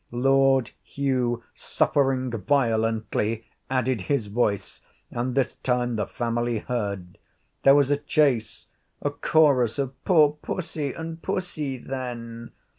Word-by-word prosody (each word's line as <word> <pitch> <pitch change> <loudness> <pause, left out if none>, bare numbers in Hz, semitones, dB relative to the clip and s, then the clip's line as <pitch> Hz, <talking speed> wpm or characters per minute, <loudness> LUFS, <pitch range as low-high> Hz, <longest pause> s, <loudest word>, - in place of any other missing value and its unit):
Lord 135 0 +3
Hugh, 125 -4 -1
suffering 130 -2 +1
violently, 115 -2 0 0.2
added 130 -3 0
his 135 +2 0
voice, 100 -2 -1 0.3
and 125 +1 -2
this 135 -3 +1
time 125 -1 0
the 105 -3 -1
family 120 0 -1
heard. 100 -6 -4 0.4
There 135 0 +7
was 145 -1 +3
a 145 - +3
chase, 145 -6 +1 0.4
a - - 0
chorus 140 -8 +3
of 135 -2 -2
'Poor 150 -5 +4
pussy!' 155 -6 -3
and 165 0 -7
'Pussy, 160 -8 -3
then!' 120 -3 -6
125 Hz, 115 wpm, -25 LUFS, 115-140 Hz, 0.4 s, There